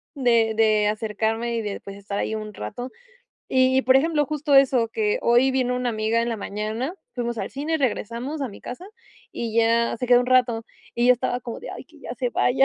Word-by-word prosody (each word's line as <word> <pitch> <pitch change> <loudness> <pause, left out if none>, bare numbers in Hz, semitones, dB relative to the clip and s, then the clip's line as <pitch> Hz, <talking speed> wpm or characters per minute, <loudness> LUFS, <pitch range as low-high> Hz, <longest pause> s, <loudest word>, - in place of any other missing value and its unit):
de 235 -4 +3
de 215 -1 +3
acercarme 220 +2 -1
y 230 - -1
de, 205 -2 -4
pues, 200 0 -10
estar 200 0 -6
ahí 220 - -1
un 215 -1 -6
rato. 245 - -6 0.6
Y 260 0 +3
y, 265 - +2
por 260 +2 +5
ejemplo, 295 0 +2
justo 295 -1 0
eso, 260 -4 +5
que 430 - 0
hoy 240 +3 +4
vino 250 -1 +1
una 250 0 -1
amiga 220 +1 0
en 235 - -1
la 230 - -2
mañana, 215 - -4 0.2
fuimos 235 -2 -3
al - - -4
cine, 300 +4 -2
regresamos 255 +2 -2
a 265 - -2
mi 200 - -12
casa 345 +10 -8 0.5
y 230 -2 -4
ya 230 +1 +3
se 250 - -3
quedó 245 0 +6
un 250 - -2
rato 245 -3 +3 0.3
y 240 +1 +1
yo 250 - +8
estaba 245 0 -2
como 235 -1 -7
de: - - -7
"Ay - - -8
que - - -20
ya - - -7
se - - -2
vaya". 265 - +3
240 Hz, 225 wpm, -24 LUFS, 225-260 Hz, 0.6 s, yo